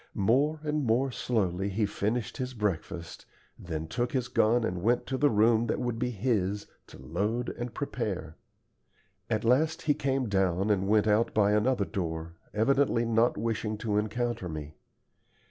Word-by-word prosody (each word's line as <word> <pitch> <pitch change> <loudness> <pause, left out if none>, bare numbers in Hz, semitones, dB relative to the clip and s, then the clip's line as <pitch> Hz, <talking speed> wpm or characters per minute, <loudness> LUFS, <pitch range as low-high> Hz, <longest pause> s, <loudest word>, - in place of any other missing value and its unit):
More 140 +10 +2
and 150 -1 -1
more 130 +3 +2
slowly 100 -6 -1
he 105 +2 0
finished 110 +3 -2
his 130 -1 -4
breakfast, 90 -4 -3 0.3
then 80 -2 -5
took 120 +7 -2
his 130 -3 -1
gun 115 +2 +3
and 90 -5 -2
went 120 +5 +2
to 135 - -3
the 145 +2 +3
room 115 +1 +3
that - - 0
would 120 -2 -2
be 125 - 0
his, 105 -3 -1 0.2
to - - -13
load 105 - -2
and 120 0 -5
prepare. 105 - -3 0.9
At 110 -1 0
last 155 +7 +2
he 150 - +3
came 135 -2 -1
down 95 0 +1
and 95 -1 +1
went 105 0 +4
out 110 +2 +2
by 105 -1 +4
another 105 0 +2
door, 80 -3 -4 0.2
evidently 120 +1 +2
not 115 +1 +2
wishing 110 0 -2
to 105 -1 -1
encounter 115 -2 -2
me. 75 -1 -6
110 Hz, 165 wpm, -29 LUFS, 100-125 Hz, 0.9 s, went